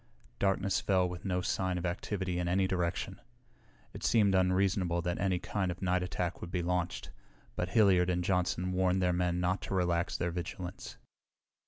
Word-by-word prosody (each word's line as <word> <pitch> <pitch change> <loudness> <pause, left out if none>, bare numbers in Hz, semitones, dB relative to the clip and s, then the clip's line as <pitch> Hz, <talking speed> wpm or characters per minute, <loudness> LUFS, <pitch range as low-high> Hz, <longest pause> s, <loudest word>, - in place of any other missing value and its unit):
Darkness 95 0 +1
fell 95 -2 +2
with 90 +1 -7
no 90 -1 0
sign 95 0 -1
of 90 - -3
activity 90 0 -2
in 90 - -1
any 95 +2 +2
direction. 90 -2 -2 0.7
It - - -9
seemed 105 -4 +4
unreasonable 95 -1 +2
that 90 0 -2
any 95 -2 +1
kind 95 +1 -2
of 90 +2 -5
night 90 0 +2
attack 90 0 -3
would 85 - -6
be 90 -1 -2
launched, 90 0 -2 0.4
but 90 - -2
Hilliard 90 -3 +4
and 90 0 0
Johnson 90 0 0
warned 90 0 +2
their 90 0 +2
men 90 0 0
not 90 +2 0
to 95 - -3
relax 85 -1 +1
their 85 - -1
vigilance. 90 +1 -6
90 Hz, 175 wpm, -32 LUFS, 90-95 Hz, 0.7 s, seemed